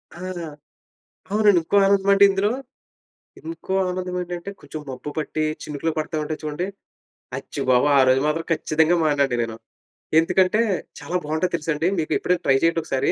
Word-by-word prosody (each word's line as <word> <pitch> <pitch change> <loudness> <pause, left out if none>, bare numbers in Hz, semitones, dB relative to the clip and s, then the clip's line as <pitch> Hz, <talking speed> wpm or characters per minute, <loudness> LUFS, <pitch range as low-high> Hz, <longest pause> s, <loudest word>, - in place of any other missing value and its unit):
ఆ! - - -11 1.2
అవునండి. 210 -3 +5
ఇంకో 185 - 0
ఆనందమంటే 200 0 +5
ఇందులో 195 +2 +1 0.9
ఇంకో 325 - -6 0.2
ఆనందమేంటంటే, 180 0 -4
కొంచుం 150 +2 -8
మబ్బు 130 +3 -6
పట్టీ, 155 0 -2 0.2
చినుకులు 150 +2 -2
పడతా 155 +1 -2
ఉంటాయి 155 +1 -4
చూడండి, 155 +5 -3 0.7
అచ్చి - - -6
బాబో! 125 +2 +4
ఆ - - +7
రోజు 130 +1 +4
మాత్రం 160 +2 0
ఖచ్చితంగా 160 +1 +2
మాననండి 140 -4 +2
నేను. 115 -1 -4 0.6
ఎందుకంటే, 185 +5 +3 0.4
చాలా 180 - -5
బావుంటది 160 +4 -1
తెలుసాండి? 160 0 -1
మీకు 155 - -3
ఎప్పుడైనా 180 0 0
ట్రై 135 - +4
చెయ్యండొకసారి. 165 -5 +1
165 Hz, 135 wpm, -23 LUFS, 150-185 Hz, 1.2 s, ఆ